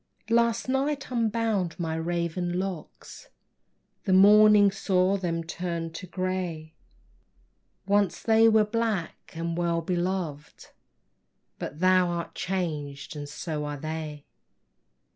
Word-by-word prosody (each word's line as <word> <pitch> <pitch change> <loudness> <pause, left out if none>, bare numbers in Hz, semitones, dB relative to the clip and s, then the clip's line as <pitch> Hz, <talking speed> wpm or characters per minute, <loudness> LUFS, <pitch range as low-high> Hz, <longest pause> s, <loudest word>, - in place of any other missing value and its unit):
Last 235 0 +2
night 270 +1 -1
unbound 225 -6 0
my 165 -2 -2
raven 175 +1 -2
locks, 185 -4 -6 0.8
The 190 - +2
morning 205 +1 +7
saw 190 -1 +1
them 170 -4 -2
turned 165 -1 -4
to 185 +3 -8
gray, 180 -4 -3 1.1
Once 200 -1 +2
they 225 0 +5
were 220 -1 +4
black 215 -5 -3
and 165 0 -3
well 170 -1 0
beloved, 175 -4 -3 0.9
But 150 - -6
thou 185 -1 +4
art 170 -1 -4
changed, 150 -7 -4
and 145 -1 -6
so 150 0 -4
are 145 0 -4
they! 155 -1 -6
180 Hz, 110 wpm, -27 LUFS, 165-205 Hz, 1.1 s, morning